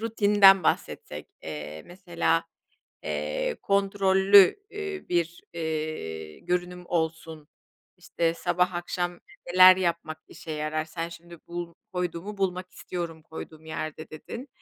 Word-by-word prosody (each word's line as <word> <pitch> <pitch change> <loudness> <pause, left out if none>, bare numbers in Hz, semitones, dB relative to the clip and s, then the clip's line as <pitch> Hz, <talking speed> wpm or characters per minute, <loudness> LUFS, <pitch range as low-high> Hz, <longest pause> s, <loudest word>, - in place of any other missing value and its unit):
rutininden 205 -4 +6
bahsetsek. - - -2
Eee, 75 0 -6
mesela, 175 -2 0 0.6
eee, - - -2
kontrollü, 195 0 +5 0.3
ııı, 400 -2 -5
bir, 170 -1 -1
eee, 155 - -4
görünüm 180 0 -2
olsun. 160 -2 -3 0.5
İşte, 170 -2 -1
sabah 180 +1 0
akşam 175 0 -3 0.3
neler 185 0 +9
yapmak 170 -3 -1
işe 160 - -10
yarar? 155 +1 -2
Sen 165 +1 -5
şimdi 170 0 -12
"Bul 175 -1 -5 0.2
koyduğumu 180 +3 -3
bulmak 185 -1 -1
istiyorum, 170 -3 -6
koyduğum 160 0 -10
yerde." 155 0 -5
dedin 235 - -8
175 Hz, 110 wpm, -27 LUFS, 160-185 Hz, 0.6 s, neler